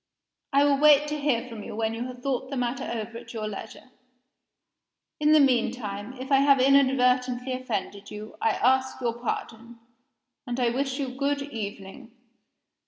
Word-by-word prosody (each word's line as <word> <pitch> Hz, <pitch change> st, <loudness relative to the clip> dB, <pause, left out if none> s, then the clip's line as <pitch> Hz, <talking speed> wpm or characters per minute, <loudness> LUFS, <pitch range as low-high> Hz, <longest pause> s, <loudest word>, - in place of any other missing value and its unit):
I 280 Hz, 0 st, +4 dB
will 280 Hz, -1 st, +3 dB
wait 295 Hz, 0 st, +6 dB
to 300 Hz, 0 st, -3 dB
hear 260 Hz, -4 st, 0 dB
from 230 Hz, -3 st, -8 dB
you 205 Hz, -, -8 dB
when 220 Hz, 0 st, -1 dB
you 235 Hz, +2 st, -4 dB
have 250 Hz, -1 st, -10 dB
thought 265 Hz, -1 st, -2 dB
the 275 Hz, -, -4 dB
matter 245 Hz, 0 st, -2 dB
over 230 Hz, 0 st, -5 dB
at -, -, -12 dB
your 215 Hz, -1 st, -3 dB
leisure. 215 Hz, +4 st, -9 dB, 1.3 s
In 300 Hz, 0 st, +3 dB
the 310 Hz, -, +7 dB
mean 255 Hz, -5 st, +3 dB
time, 210 Hz, -1 st, -6 dB
if 260 Hz, +2 st, -8 dB
I 270 Hz, -, +6 dB
have 275 Hz, 0 st, +5 dB
inadvertently 255 Hz, -1 st, +3 dB
offended 205 Hz, -5 st, -4 dB
you, 210 Hz, +1 st, -9 dB
I -, -, +3 dB
ask 260 Hz, +3 st, +1 dB
your 240 Hz, -2 st, -1 dB
pardon 235 Hz, -1 st, -5 dB, 0.7 s
and 245 Hz, +1 st, -3 dB
I 240 Hz, -2 st, +2 dB
wish 270 Hz, +1 st, -2 dB
you 270 Hz, -2 st, -2 dB
good 280 Hz, +2 st, -1 dB
evening." 225 Hz, -1 st, -7 dB
250 Hz, 170 wpm, -26 LUFS, 230-275 Hz, 1.3 s, the